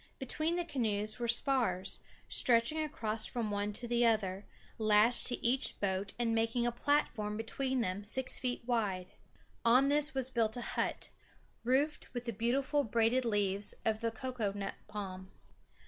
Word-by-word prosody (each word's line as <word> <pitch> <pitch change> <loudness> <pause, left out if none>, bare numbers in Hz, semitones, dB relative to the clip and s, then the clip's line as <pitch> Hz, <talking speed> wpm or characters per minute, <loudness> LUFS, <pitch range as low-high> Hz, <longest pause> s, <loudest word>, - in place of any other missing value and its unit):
Between 310 +5 -1
the 350 -1 -1
canoes 215 -8 -2
were 240 - -1
spars, 235 -7 0 0.3
stretching 240 +5 +3
across 225 -8 -2
from 230 -4 -3
one 205 0 -1
to 240 +3 -3
the 240 0 +2
other, 205 -4 +1 0.3
lashed 215 +2 +5
to 245 - -1
each 255 +3 +1
boat 195 0 -1
and 235 -1 0
making 225 +1 +1
a 240 - +1
platform 235 -5 0
between 260 +3 -1
them 190 -1 -2
six 255 +5 +2
feet 250 -2 -2
wide. 205 -7 -1 0.5
On 250 +4 +5
this 295 0 +3
was 265 -1 0
built 225 -2 0
a - - -4
hut, - - -2 0.5
roofed 275 +5 0
with 245 0 -4
the 235 - -3
beautiful 265 +6 +1
braided 235 +2 +2
leaves 205 -2 0
of 220 0 0
the 230 - +1
cocoa 230 -2 -3
nut 200 -1 -4
palm. 190 -3 -6
230 Hz, 160 wpm, -33 LUFS, 210-255 Hz, 0.5 s, lashed